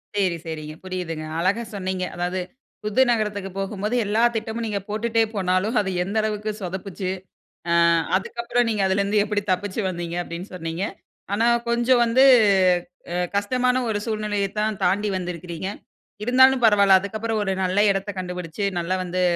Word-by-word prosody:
செரி 185 -4 +1
சரிங்க 155 -1 -6
புரியுதுங்க. 180 -4 -4
அழகா 195 +7 +1
சொன்னீங்க. 185 -1 -2
அதாவது, 180 +1 -2 0.4
புது 210 +4 +2
நகரத்துக்கு 210 -4 -1
போகும்போது 205 +3 -2
எல்லா 215 +3 +1
திட்டமும் 225 +1 -3
நீங்க 205 -2 -2
போட்டுட்டே 225 +2 +1
போனாலும், 185 +4 0
அது 195 - -3
எந்த 195 +4 -5
அளவுக்கு 215 0 -2
சொதப்பிச்சு. 185 +1 -4 0.6
அ - - +4 0.4
அதுக்கப்புறம் 235 +4 0
நீங்க 215 -2 0
அதிலருந்து 200 +2 +2
எப்படி 210 -1 -1
தப்பித்து 185 +3 -2
வந்தீங்க? 170 -1 -4
அப்டின்னு 170 +4 -7
சொன்னீங்க. 165 +1 -4 0.5
ஆனா 220 +3 +2 0.2
கொஞ்சம் 240 +1 +3
வந்து 245 +3 +4 0.9
அ - - -2 0.2
கஷ்டமான 250 +5 +1
ஒரு 210 -2 0
சூழ்நிலையத் 210 -2 -2
தான் 215 -1 -1
தாண்டி 205 +4 +1
வந்திருக்கிறீங்க. 175 -1 -5 0.6
இருந்தாலும் 260 +1 +5
பரவால்ல 200 -3 +6
அதுக்கப்புறம் 215 +3 -3
ஒரு 195 - -1
நல்ல 185 +1 -1
இடத்த 195 +1 -2
கண்டுபிடிச்சு 180 0 -5 0.2
நல்லா 175 +2 -1
வந்து 180 0 -2
200 Hz, 145 wpm, -23 LUFS, 185-220 Hz, 0.9 s, பரவால்ல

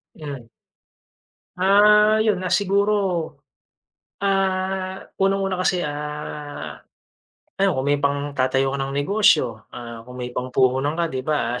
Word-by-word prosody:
'Yan. 140 -6 -8 1.1
Ah, 210 +3 +5
yun, 215 -4 +1
ah, 185 - -3
siguro, 200 +1 +2 1.3
ah, 190 -1 -1 0.2
unang-una 195 -1 +1
kasi, 185 -1 +1
ah, 150 0 -6 0.8
ano, 195 0 +4
kung 130 - -1
may 145 0 +1
pangtatayo 140 -2 0
ka 140 - -3
ng 135 0 -3
negosyo, 145 - +2
ah, 115 -1 -9
kung 125 - -10
may 125 - -7
pangpuhunan 130 +3 0
ka, 170 - +1
di 130 - -2
ba, 130 -4 -1
150 Hz, 120 wpm, -22 LUFS, 135-195 Hz, 1.3 s, Ah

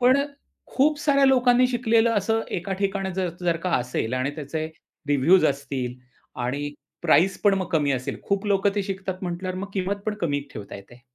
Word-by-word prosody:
पण 250 +2 +5
अ, - - -3 0.4
खूप 295 +2 +2
साऱ्या 280 -2 +3
लोकांनी 250 -1 +5
शिकलेलं 230 -2 +3
असं 225 +3 0 0.2
एका 175 +3 -5
ठिकाणी 195 -1 0
ज 185 -1 0
जर 175 -2 +1
का 180 - 0
असेल 125 -1 -2
आणि 130 +2 0
त्याचे 155 +2 -3 0.4
रिव्ह्यूज 145 +6 +5
असतील 130 -4 -2 0.5
आणि 140 +4 -2 0.3
प्राईस 175 +7 +3
पण 205 -2 +5
मग 190 -1 -2
कमी 145 -3 +2
असेल, 130 -1 -3
खूप 200 +1 -1
लोक 200 -1 +2
ते 205 - 0
शिकतात 190 -1 -5
म्हटल्यावर 185 +1 -3
मग 200 +1 -5
किंमत 195 +1 -1
पण 215 - 0
कमी 145 -4 0
ठेवता 105 - -8
येते. 110 +5 -15
185 Hz, 185 wpm, -24 LUFS, 145-210 Hz, 0.5 s, पण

